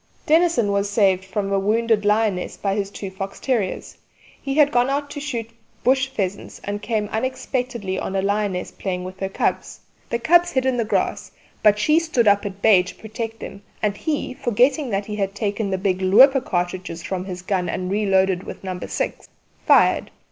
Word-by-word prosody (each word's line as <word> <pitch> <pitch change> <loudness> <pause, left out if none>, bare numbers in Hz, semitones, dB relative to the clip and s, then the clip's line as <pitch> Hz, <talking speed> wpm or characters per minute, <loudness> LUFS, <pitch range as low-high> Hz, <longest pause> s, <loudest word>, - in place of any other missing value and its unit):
Dennison 315 -9 +3
was 200 0 0
saved 195 -3 +2
from 195 +1 -3
a 195 - +3
wounded 215 +1 +1
lioness 210 -3 +1
by 195 -1 -1
his 200 -1 -2
two 200 -1 -7
fox 195 +1 -6
terriers. 230 -8 -2 0.4
He 275 -1 -3
had 295 -1 +5
gone 245 0 +2
out 285 +1 -2
to 290 - -5
shoot 235 -6 -4 0.3
bush 265 +1 +3
pheasants, 200 -7 -4
and 205 +1 -4
came 215 -3 -1
unexpectedly 240 -4 -2
on 190 - -4
a 190 - +1
lioness 200 -2 -1
playing 180 -2 -4
with 185 +1 -8
her 195 - -2
cubs: - - -2 0.3
the 235 - 0
cubs 345 +8 +3
hid 260 -1 +1
in 260 -1 +2
the 230 - 0
grass, - - -1 0.3
but 210 -1 +5
she 305 +9 +3
stood 285 -9 +1
up 205 0 +4
at 195 0 -10
bay 205 -5 +7
to 180 - -9
protect 225 +1 -6
them, 200 - -8 0.2
and 205 -1 +1
he, 295 +1 -2
forgetting 255 +3 +1
that 200 -1 -1
he 210 0 -5
had 195 -1 -2
taken 205 0 -2
the 190 - 0
big 190 -1 -1
'looper' 255 +9 +6
cartridges 175 -3 -3
from 185 -1 -3
his 180 -2 -7
gun 185 -2 -1
and 185 +1 -3
reloaded 190 -3 +2
with - - -9
No. 185 -1 -4
6, - - -4 0.4
fired. - - +4
205 Hz, 190 wpm, -22 LUFS, 190-245 Hz, 0.4 s, bay